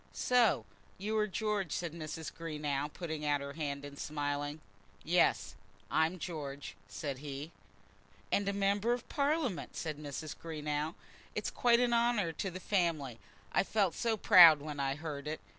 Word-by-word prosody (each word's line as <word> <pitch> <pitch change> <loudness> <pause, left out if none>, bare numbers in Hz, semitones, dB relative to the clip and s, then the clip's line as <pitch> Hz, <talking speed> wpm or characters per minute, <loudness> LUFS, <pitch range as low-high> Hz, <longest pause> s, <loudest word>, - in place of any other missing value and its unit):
"So 245 -3 +3 0.3
you 210 +3 -2
are 210 - +2
George," 210 -4 -1
said 170 -3 -2
Mrs. 160 -1 -6
Greenow, 150 -3 -3
putting 160 -3 -5
out 145 -1 +2
her 140 0 -6
hand 145 -2 -3
and 140 0 -10
smiling. 145 0 -2 0.4
"Yes; 110 - +2 0.4
I'm 160 +3 +2
George," 145 -5 -6
said 130 +6 -5
he. 145 +2 -6 0.8
"And 200 0 +2
a - - +2
Member 200 +3 +2
of 245 -1 -5
Parliament!" 285 - 0
said 155 -3 -4
Mrs. 150 +1 -6
Greenow. 150 -1 -3 0.4
"It's - - -2
quite 235 -1 +4
an 245 -1 +2
honour 235 -7 +2
to 190 +4 -3
the 185 +1 -7
family. 165 - 0 0.3
I - - +3
felt 195 -4 +1
so 230 -2 0
proud 170 -6 +9
when 145 0 -6
I 135 0 0
heard 150 -2 -6
it!" 155 +1 -3
160 Hz, 160 wpm, -33 LUFS, 145-200 Hz, 0.8 s, proud